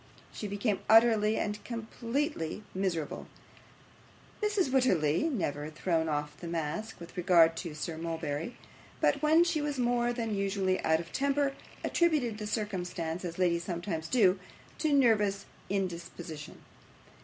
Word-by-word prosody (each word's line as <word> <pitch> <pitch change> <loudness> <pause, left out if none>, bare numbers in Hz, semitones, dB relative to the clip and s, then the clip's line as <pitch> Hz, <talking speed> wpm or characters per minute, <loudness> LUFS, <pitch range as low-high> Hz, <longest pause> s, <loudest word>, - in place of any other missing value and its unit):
She 210 - -5
became 205 +1 -1
utterly 220 -1 +6
and 210 0 -2
completely 230 - -3
miserable. 185 -5 -2 1.1
Mrs. 415 -5 +2
Wititterly 185 - +3
had 325 - 0
never 150 - -2
thrown 160 0 0
off 150 0 -2
the 175 - -7
mask 170 +7 -3
with 170 +1 -11
regard 170 -3 +5
to 165 -3 -5
Sir 160 +1 -4
Mulberry, 165 +3 -3 0.4
but - - +2
when 315 +2 +6
she 335 -3 0
was 295 -1 -2
more 240 -1 +2
than 230 -3 -2
usually 195 -1 0
out 160 0 +3
of 170 0 -8
temper, 280 0 +1 0.3
attributed 290 -11 +1
the 210 - -4
circumstance, 180 -6 -3
as 170 -2 -5
ladies 170 -2 +2
sometimes 170 -2 -3
do, 195 -7 +4 0.4
to 310 -1 +1
nervous 210 -7 +3 0.2
indisposition. 175 -4 -4
195 Hz, 135 wpm, -31 LUFS, 165-240 Hz, 1.1 s, utterly